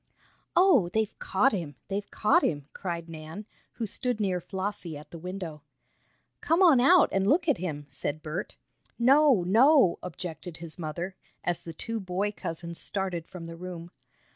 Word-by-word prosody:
"Oh, 340 - +5
they've 220 +2 0
caught 210 +8 +2
him! 165 -8 -4
They've 200 0 -3
caught 215 - +3
him!" 145 -3 -1
cried 170 -3 -4
Nan, 160 +5 -8 0.3
who 230 - -3
stood 245 +1 -2
near 185 -4 0
Flossie 190 -4 -4
at 150 - -13
the 170 - -8
window. 180 -3 -6 0.8
"Come 335 +4 +3
on 315 -8 +7
out 340 +7 +6
and 195 0 +1
look 325 - +3
at 295 - +2
him!" 150 -5 -4
said 145 +2 -4
Bert. 160 +5 -5 0.4
"No, 265 -3 +5
no!" 245 - +5
objected 175 -1 -7
his 165 +1 -8
mother, 170 +3 -4 0.3
as 175 -1 -1
the 165 - -8
two 225 +7 -3
boy 195 +1 -1
cousins 170 -3 -5
started 185 -4 -2
from 175 -2 -9
the 165 0 -8
room. 175 -1 -8
185 Hz, 165 wpm, -28 LUFS, 165-220 Hz, 0.8 s, on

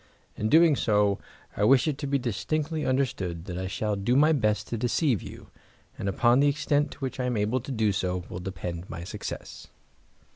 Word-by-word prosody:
In 110 - -1
doing 160 +1 +6
so 105 -4 +2 0.4
I 105 - 0
wish 130 +4 +5
it 150 -2 -1
to 145 - -3
be 140 0 +2
distinctly 150 - -2
understood 95 -11 -1
that 90 -2 -5
I 95 - -3
shall 105 +2 -1
do 100 +5 0
my 150 +3 +5
best 110 -7 0
to 115 - -2
deceive 125 - +1
you, - - -11 0.4
and 100 - -3
upon 120 +5 +3
the 145 - +4
extent 145 0 +1
to - - -19
which 130 0 -4
I 125 - 0
am 125 -2 0
able 105 +5 +1
to 130 +3 -7
do 110 -4 +1
so 90 -2 -2
will - - -6
depend 90 -1 -6
my 85 - -6
success." 90 - -7
120 Hz, 205 wpm, -27 LUFS, 100-140 Hz, 0.4 s, doing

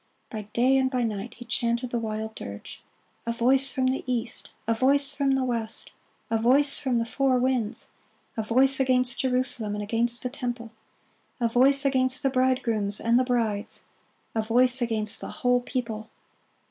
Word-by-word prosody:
By 215 -2 -6
day 255 +3 +3
and 260 0 +1
by 250 -2 -1
night 215 0 -4
he 240 - -11
chanted 235 +1 -1
the 240 - -1
wild 220 0 -4
dirge, 100 - -9 0.5
"A - - +1
voice 260 +3 +2
from 260 - -1
the 260 +1 0
east! 235 -1 -2 0.2
a 230 - +3
voice 275 +4 +2
from 275 -1 +1
the 265 - 0
west! 230 -3 -4 0.4
a 225 - +2
voice 275 +5 +3
from 260 -4 0
the 230 - 0
four 265 +2 +1
winds! 250 -4 -1 0.5
a 220 - -1
voice 260 +5 +3
against 255 -1 +1
Jerusalem 250 -5 0
and 210 - -4
against 235 +3 +1
the 250 - -2
temple! 240 -4 -5 0.7
a 235 - +2
voice 270 +4 +4
against 260 0 +2
the 270 - +2
bridegrooms 245 -6 +1
and 235 +2 +3
the - - +3
brides! 230 -4 -2 0.5
a 220 - 0
voice 245 +3 +3
against 220 -3 -1
the - - -6
whole 250 -4 +1
people!" 230 -4 -4
245 Hz, 170 wpm, -26 LUFS, 225-260 Hz, 0.7 s, voice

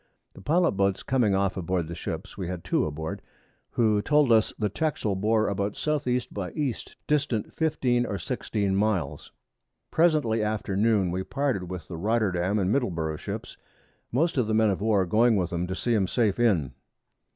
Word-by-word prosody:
The - - -13
Pilot 170 - +2
Boats 100 0 0
coming 120 -7 +2
off 95 -1 +1
aboard 90 -2 -1
the 85 - -6
Ships, 85 +3 -6
we 95 -3 -4
had 90 -1 -5
2 - - +1
aboard, 80 +2 -5 0.5
who 110 -3 +2
told 145 +1 +3
us 110 -1 +4
the 105 - 0
Texel 110 -3 -1
bore 110 +3 +2
about 100 0 -1
S.E. 125 -5 0
by 95 -3 -4
E. 145 -5 0 0.3
distant 140 -7 0
15 125 -6 +1
or 100 - -3
16 100 -4 -2
Miles. 95 -8 -1 0.6
Presently 150 -10 +3
after 105 -2 -2
Noon 100 -3 +2
we 90 +1 -2
parted 130 -9 -2
with 90 -3 -6
the 85 - -6
Rotterdam 100 -1 +1
and 95 -1 +1
Middleburgh 85 - -1
Ships, - - -6 0.5
most 145 +3 +1
of 120 - +1
the 110 - +1
Men 110 -1 +4
of 95 - -3
War 105 -3 +2
going 110 +5 +3
with 90 -3 -1
'em 85 +1 -1
to 95 - -3
see 120 +4 0
'em 100 -4 +2
safe 110 0 +1
in. 95 - +2
105 Hz, 180 wpm, -26 LUFS, 95-120 Hz, 0.6 s, us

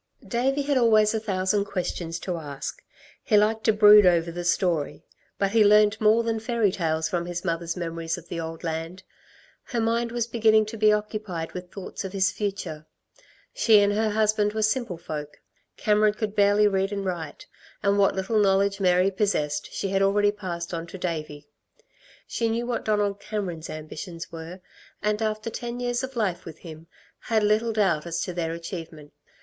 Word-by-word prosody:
Davey 270 +4 0
had 280 -2 +1
always 215 -2 +4
a 220 - 0
thousand 200 -1 0
questions 175 -4 -3
to 180 - -3
ask. 145 -3 -6 0.4
He 215 - +3
liked 220 +1 +2
to 220 - +6
brood 210 0 +8
over 170 -2 +3
the 175 +1 -5
story; 175 -4 0 0.3
but 195 -1 0
he 220 0 +5
learnt 210 +1 +5
more 215 +2 +4
than 225 -1 -1
fairy 225 -2 +1
tales 160 -3 -1
from 175 -4 -2
his 175 0 -5
mother's 170 0 -2
memories 165 -1 -3
of 175 -1 -12
the 170 - -5
old 165 +1 -6
land. 165 +3 -4 0.6
Her 240 - -3
mind 230 +1 0
was 240 -1 -1
beginning 220 -2 +3
to 215 +2 -7
be 215 0 +5
occupied 210 -6 -3
with 180 -1 -8
thoughts 195 +1 -7
of 190 0 -6
his 190 -1 +2
future. 195 -8 -4 0.7
She 220 -3 +5
and 205 0 +2
her 220 +1 +1
husband 210 -1 +1
were 220 0 -1
simple 215 -4 0
folk. 150 -3 -7 0.4
Cameron 210 0 +3
could 215 -1 -3
barely 205 0 +4
read 195 0 0
and 200 -1 -3
write, 170 -5 -5 0.4
and 200 0 +2
what 200 - +3
little 195 +3 0
knowledge 200 0 +2
Mary 185 0 +3
possessed 185 -7 -1
she 195 - -3
had 195 0 +1
already 205 +1 +3
passed 175 -4 -6
on 165 0 -4
to 180 - -9
Davey. 155 -5 -5 0.8
She 230 -1 -1
knew 230 +2 -1
what 240 -2 -3
Donald 205 -2 0
Cameron's 195 -6 -5
ambitions 165 +2 -7
were, 165 +3 -8 0.4
and 210 +1 0
after 215 +1 -2
ten 240 +1 -5
years 245 0 -1
of 260 0 -6
life 205 -7 -1
with 160 -2 -10
him 160 -1 -11 0.3
had 220 -2 0
little 215 +2 +2
doubt 190 -7 +1
as 170 0 -2
to 180 - -3
their 165 -2 -2
achievement. 165 -3 -8
200 Hz, 185 wpm, -25 LUFS, 170-215 Hz, 0.8 s, brood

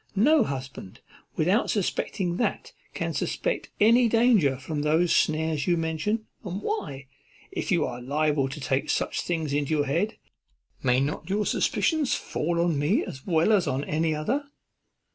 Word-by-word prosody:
No 280 +7 +5
husband, 130 - -6 0.4
without 185 +8 +2
suspecting 185 -2 -1
that, 235 - -2 0.2
can - - -2
suspect - - -2
any 230 +3 +5
danger 220 - +4
from 145 +3 -4
those 160 +4 +2
snares 155 -2 +1
you 175 -1 +3
mention; 165 +7 -1 0.2
and 190 -1 -4
why, 140 - -3 0.5
if - - -3
you 170 -4 +3
are 120 0 -5
liable 145 +1 0
to 145 +3 -7
take 135 0 -1
such - - 0
things 160 -4 -2
into 145 +2 0
your 145 -1 +1
head, 170 +10 -1 0.6
may 125 0 +3
not 145 +6 -3
your 205 +2 0
suspicions 315 -5 +1
fall 170 +2 -2
on 170 -4 +1
me 145 +1 +1
as 130 - -9
well 165 +3 +3
as 200 -5 +3
on 130 +2 -1
any 155 +1 0
other? 245 - -1
160 Hz, 160 wpm, -26 LUFS, 145-205 Hz, 0.6 s, No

